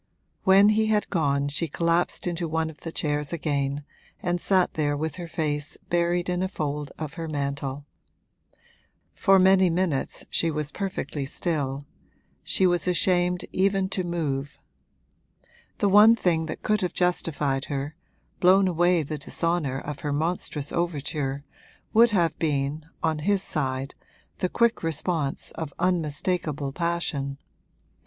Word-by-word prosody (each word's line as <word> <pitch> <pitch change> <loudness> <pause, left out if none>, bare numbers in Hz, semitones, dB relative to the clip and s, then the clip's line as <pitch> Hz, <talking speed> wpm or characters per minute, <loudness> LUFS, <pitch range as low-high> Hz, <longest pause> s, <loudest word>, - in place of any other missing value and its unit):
When 195 +2 +7
he 215 +1 +3
had 215 -1 +1
gone 140 -5 +1
she 155 +4 -2
collapsed 170 +3 0
into 175 -1 -2
one 160 0 -1
of 155 - -19
the 165 - -6
chairs 150 -2 -1
again 145 -3 -1 0.4
and 175 -1 -1
sat 185 -2 +2
there 145 -2 0
with 160 +2 -3
her 175 -2 -6
face 150 -3 -2
buried 175 0 +1
in 180 0 0
a 190 - +1
fold 150 -5 -3
of 155 -1 -5
her 165 -1 -5
mantle. 140 -1 -3 1.3
For 195 0 +4
many 190 0 +5
minutes 165 -5 -1
she 165 - +2
was 150 -1 -2
perfectly 145 -8 -3
still 140 -3 -2 0.6
she 190 - +1
was 175 -1 +2
ashamed 180 0 +2
even 195 0 +1
to 190 -1 -2
move. 150 -5 -2 1.2
The 205 - +2
one 210 +3 +8
thing 165 -7 +1
that 155 - -6
could 215 -1 +1
have 180 - -1
justified 150 -6 0
her, 145 +1 -4 0.4
blown 190 +2 +5
away 175 -1 +3
the 150 +1 -5
dishonour 160 -2 -1
of 145 +1 -6
her 145 - -3
monstrous 150 -1 -2
overture, 145 -4 -2 0.5
would 235 +2 +7
have 170 -7 +1
been, 150 0 -1 0.2
on 160 -1 +1
his 195 +4 +1
side, 135 -4 -1 0.5
the 185 - 0
quick 235 +2 +2
response 160 -2 -1
of 160 -3 -5
unmistakable 160 -3 -1
passion. 155 -4 -2
165 Hz, 140 wpm, -26 LUFS, 145-180 Hz, 1.3 s, one